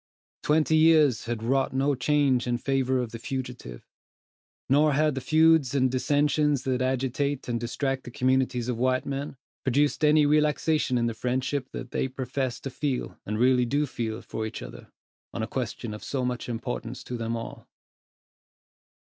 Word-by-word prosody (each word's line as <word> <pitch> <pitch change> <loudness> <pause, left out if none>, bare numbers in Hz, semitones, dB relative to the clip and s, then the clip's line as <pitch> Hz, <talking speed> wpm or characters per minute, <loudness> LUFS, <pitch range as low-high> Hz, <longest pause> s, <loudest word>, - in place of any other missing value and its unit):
Twenty 155 +1 +3
years 155 -6 +4
had 115 -1 -3
wrought 135 +3 +1
no 140 +2 +2
change 130 -1 +2
in 120 0 +1
favor 130 0 0
of 115 - -7
the 115 - -7
fugitive; 125 - -6 0.8
nor 150 +2 +4
had 155 +1 +2
the 135 - -4
feuds 160 -2 +4
and 130 -2 +2
dissentions 145 +1 +1
that 130 -1 -1
agitate 130 +2 -1
and 120 -1 -1
distract 135 +3 -2
the - - -7
communities 130 -2 0
of 125 -2 -2
white 130 +1 +1
men, 140 0 -4 0.3
produced 145 +4 +1
any 150 0 +5
relaxation 150 -2 +2
in 120 - +1
the 115 - -1
friendship 130 +3 -2
that 125 - -7
they - - 0
profess 130 -1 -3
to 135 - -5
feel, 135 -1 -3
and 105 +1 -2
really 125 +1 +4
do 145 +4 +1
feel, 115 -4 -4
for 110 0 -4
each - - -7
other, - - -11 0.4
on - - -2
a - - -2
question 110 -3 -4
of 105 - -8
so 130 -3 -2
much 125 0 -3
importance 120 +1 -5
to 125 - -6
them 115 0 -2
all. 115 - -8
130 Hz, 170 wpm, -26 LUFS, 120-145 Hz, 0.8 s, any